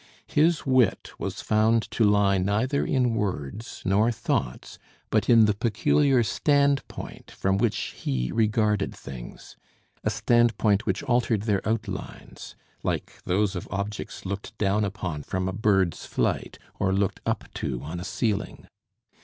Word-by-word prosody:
His 160 +2 +2
wit 130 -6 +2
was - - -4
found 110 +1 +3
to 115 - +1
lie 100 -2 +4
neither 110 +9 +1
in 125 -3 +1
words 100 - -4
nor 105 +5 +3
thoughts, 70 - -3 0.3
but - - +1
in 115 -2 +7
the 105 - +3
peculiar 120 +5 +2
standpoint 140 +5 0
from 95 0 0
which 115 -1 0
he 60 -2 -2
regarded 105 -2 +1
things, 60 -3 -10 0.5
a - - +1
standpoint 115 -3 +2
which 95 +6 0
altered 120 -6 +1
their 105 -3 +1
outlines, 110 -4 -5 0.3
like - - -3
those 100 +2 +1
of 90 - -5
objects 100 +2 -5
looked 100 +2 -5
down 105 +1 +1
upon 90 -6 -3
from 95 +5 -3
a 95 - -2
bird's 95 -4 +1
flight, - - -1 0.2
or 95 - +1
looked 100 0 0
up - - -1
to 60 -2 -3
on 80 +4 -5
a - - -5
ceiling. 105 +3 -2
105 Hz, 140 wpm, -26 LUFS, 95-115 Hz, 0.5 s, in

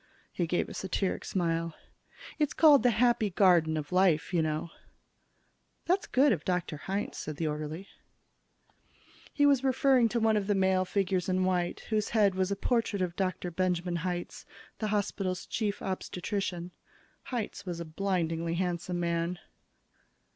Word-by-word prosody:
He 175 - -2
gave 175 - 0
a - - -8
satiric 190 0 -2
smile. 165 -3 -1 0.6
"It's 300 -2 +1
called 295 -5 +7
'The 245 - +4
Happy 235 -3 +3
Garden 175 -4 +4
of 150 +1 -5
Life,' 180 -3 +2
you 170 - +3
know." 155 +1 -2 1.1
"That's 365 +2 +1
good 275 +2 +4
of 165 -8 0
Dr. 180 -4 -1
Hitz," 205 +8 -3
said 155 - -5
the 165 - -2
orderly. 155 +4 -4 1.4
He 290 - +2
was 280 -2 +4
referring 260 -2 +3
to 235 - 0
one 220 -1 +3
of 200 -1 -2
the 205 - +2
male 190 -1 +2
figures 185 -2 0
in 185 0 +1
white, 180 -2 0
whose 215 -1 +1
head 210 -3 +3
was 185 0 0
a 200 - 0
portrait 225 -2 0
of 175 -1 -3
Dr. 185 -2 -2
Benjamin 175 0 -1
Hitz, 175 +1 -4 0.4
the 215 - -1
hospital's 195 -3 -2
Chief 210 -2 -2
Obstetrician. 185 -1 -3 0.6
Hitz 235 -5 -4
was 175 -2 -4
a 170 - -5
blindingly 165 -1 -1
handsome 175 0 -2
man. 170 +1 -1
185 Hz, 155 wpm, -30 LUFS, 170-210 Hz, 1.4 s, called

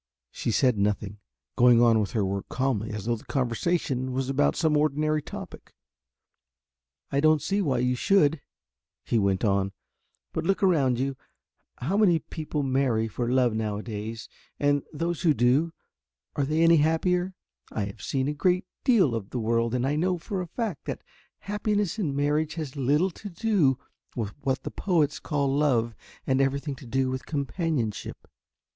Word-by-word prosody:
She - - -3
said 125 -1 +2
nothing, 105 0 -1 0.4
going 120 -1 +6
on 115 -2 +5
with 105 -3 -2
her 105 -4 +1
work 100 +1 -3
calmly 125 -5 -1
as 105 -1 -5
though 120 0 +1
the - - -15
conversation 130 0 -1
was 130 +1 -1
about 70 - +2
some 155 -2 +2
ordinary 155 +1 +1
topic. - - -10 1.4
"I 140 - +1
don't 155 +1 +4
see 200 +6 0
why 140 -9 +1
you 125 +1 +1
should," 155 +1 +3 0.6
he 115 - +1
went 100 0 +1
on, 100 -1 +1 0.6
"but - - -2
look 195 +4 0
around 140 -10 +3
you 135 0 -1 0.6
how 175 +11 -1
many 195 -6 +5
people 155 -1 -4
marry 130 -4 +1
for 120 +2 -3
love 125 -3 +3
now 110 -2 -2
a 105 - -6
days 110 0 -6 0.3
and 145 0 +2
those 165 +1 -2
who 160 -4 +3
do, 135 +7 +3 0.6
are 140 - +1
they 155 +3 +1
any 165 0 +6
the - - +4
happier? 180 +4 +1 0.4
I 105 - -2
have 100 - -9
seen 135 -1 -1
a - - +1
very 150 - -4
great 180 +2 +2 0.2
deal 200 - +4
of 110 -3 -4
the 125 - -3
world 115 +1 +1
and 125 0 0
I 145 +2 0
know 180 +3 +1
for 185 +3 -4
a 180 - -5
fact 225 +6 -4
that - - -5 0.4
happiness 210 -1 -1
in 150 -9 -1
marriage 150 +2 0
has 155 -5 -5
little 145 +7 +2
to 205 +4 -9
do 170 - +2 0.4
with 110 -4 -2
what 130 -1 -1
the - - -5
poets 160 -6 +1
call 140 -3 0
love 125 -6 +2 0.3
and 130 0 +2
everything 140 +2 0
to 130 - -12
do 130 +2 0
with 130 0 -5
companionship. 140 - -3
140 Hz, 175 wpm, -27 LUFS, 120-160 Hz, 1.4 s, going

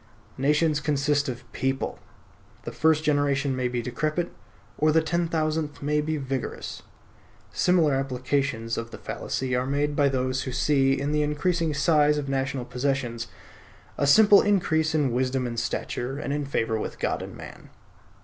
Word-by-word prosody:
Nations 150 +2 +2
consist 145 -1 +1
of 120 -1 -6
people; 135 0 -2 0.6
the - - -5
first 155 0 +2
generation 140 -2 +1
may 130 -1 0
be 120 -1 -2
decrepit, 155 +7 -2 0.5
or 155 +1 +4
the 160 - +4
ten 170 +1 0
thousandth 155 -2 -2
may 150 +1 +1
be 155 +1 -2
vigorous. 135 -2 -4 0.7
Similar 170 -5 +3
applications 130 -3 -1
of 115 0 -6
the - - -9
fallacy 130 -1 -3
are 125 +1 0
made 145 +1 0
by 145 -1 +3
those 130 0 -1
who 130 - -4
see 135 +1 +2
in 140 +1 -1
the 150 0 +1
increasing 155 +2 0
size 150 +1 +3
of 145 -1 -3
national 135 -1 -1
possessions, 125 -3 -2 0.7
a 140 - 0
simple 205 +6 +7
increase 160 -6 +1
in 145 -5 +2
wisdom 130 +1 0
and 115 -1 -3
stature, 120 +3 -3
and 140 -1 -3
in 145 0 -2
favor 115 -5 -1
with - - -5
God - - -1
and - - -8
man. - - -11
140 Hz, 160 wpm, -26 LUFS, 130-150 Hz, 0.7 s, simple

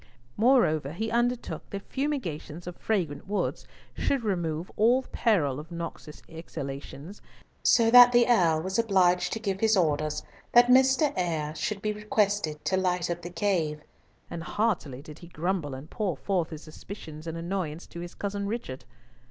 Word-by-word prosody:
Moreover, 180 - +3
he 220 +5 -3
undertook 240 +1 -1
that 200 -1 -7
fumigations 180 - -3
of 180 0 -6
fragrant 180 -10 -2
woods 205 +1 -2 0.3
should 275 -4 0
remove 175 -5 -2
all 240 +5 +4
peril 155 - +1
of 155 +3 -10
noxious 170 -2 -7
exhalations, 150 +2 -8 0.4
so 225 -1 +4
that 245 0 +10
the 240 -1 +5
Earl 170 -9 +3
was 190 +3 -1
obliged 185 -5 +3
to 225 - -3
give 195 -3 -2
his 220 -1 +3
orders 155 -3 0 0.3
that 245 0 +7
Mr. 265 +3 +5
Eyre 160 -4 -1
should 200 +5 -3
be 215 0 0
requested 205 -6 -1
to 190 - +1
light 180 -2 0
up 175 0 -4
the 175 - -6
cave, 170 -6 -1 0.4
and 165 - -6
heartily 170 - -1
did 150 -1 -11
he 170 - -12
grumble 170 -4 -2
and 135 +3 -9
pour 195 -9 -2
forth 175 +3 -1
his 155 -2 -8
suspicions 155 -1 -10
and 165 0 -4
annoyance 170 -2 -4
to 170 - -10
his 175 +1 -8
cousin 200 0 -3
Richard. 200 - -5
180 Hz, 160 wpm, -27 LUFS, 155-220 Hz, 0.4 s, that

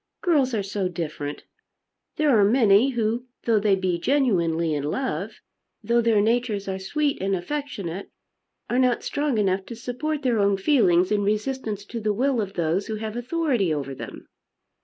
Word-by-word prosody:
"Girls 280 -9 +2
are 205 - -1
so 195 -1 -2
different! 155 -4 -5 0.7
There 300 -4 +3
are 210 - +5
many 220 +2 +5
who 235 0 -1 0.2
though 225 -2 +3
they 205 -1 +3
be 185 -2 -1
genuinely 170 - +1
in 145 - -1
love, 205 - -2 0.5
though 235 +2 +2
their 225 -3 +3
natures 225 -2 0
are 190 0 -3
sweet 285 +9 -1
and 195 0 +1
affectionate, 200 - -5 0.6
are 245 - 0
not 250 -2 +2
strong 290 -4 -1
enough 195 -2 +1
to 235 - -7
support 275 +6 -3
their 240 -4 +2
own 200 -1 +3
feelings 190 - +3
in 210 -1 +2
resistance 215 0 -2
to 235 - -6
the 215 -1 0
will 255 +2 +1
of 195 -2 -5
those 170 +3 0
who 220 - -3
have 215 0 -5
authority 245 - 0
over 140 -3 -2
them." - - -9
215 Hz, 170 wpm, -24 LUFS, 190-250 Hz, 0.7 s, are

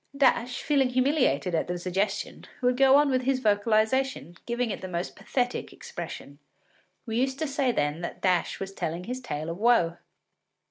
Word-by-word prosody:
” - - -11
Dash, 250 -2 +2
feeling 275 -4 +2
humiliated 250 - +1
at 160 - 0
the 180 0 -2
suggestion, 190 +3 -2 0.2
would 250 0 +3
go 270 +1 +6
on 290 -1 +4
with 255 -1 +2
his 260 0 +1
vocalisation, 215 - +1
giving 240 -1 -1
it - - -5
the 185 - -5
most 175 0 -4
pathetic 245 +4 -2
expression. - - -8 0.7
We 225 -1 -2
used 265 +1 0
to 315 - -1
say 275 -2 +1
then 150 -5 -1
that 175 - -5
Dash 180 -3 +1
was 195 0 -5
telling 170 -1 -3
his 250 +5 -5
tale 155 -10 -4
of 165 +2 -5
woe. 210 -8 +3
235 Hz, 180 wpm, -27 LUFS, 180-260 Hz, 0.7 s, go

